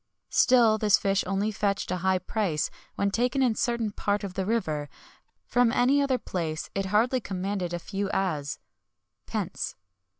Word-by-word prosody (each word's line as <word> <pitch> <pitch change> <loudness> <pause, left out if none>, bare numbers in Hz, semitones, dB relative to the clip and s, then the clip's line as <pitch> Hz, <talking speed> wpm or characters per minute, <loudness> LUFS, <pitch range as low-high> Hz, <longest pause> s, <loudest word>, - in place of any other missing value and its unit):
Still 235 -4 +5
this 210 -2 +5
fish 195 0 +1
only 195 +3 0
fetched 200 -3 -1
a 185 - 0
high 190 +1 +2
price 185 -4 -1 0.2
when 200 0 0
taken 250 +5 +1
in 250 - +4
a - - -3
certain 235 -1 0
part 205 0 -1
of 195 -2 -5
the 190 0 -2
river; 155 -10 -1 0.6
from 245 -2 +3
any 265 +4 +3
other 270 -2 +2
place 165 -8 -4
it 195 -1 -1
hardly 230 +6 +2
commanded 190 -2 -3
a 175 - -1
few 195 +3 -3
as 155 -9 -1 0.7
(pence). - - -3
200 Hz, 165 wpm, -27 LUFS, 185-230 Hz, 0.7 s, Still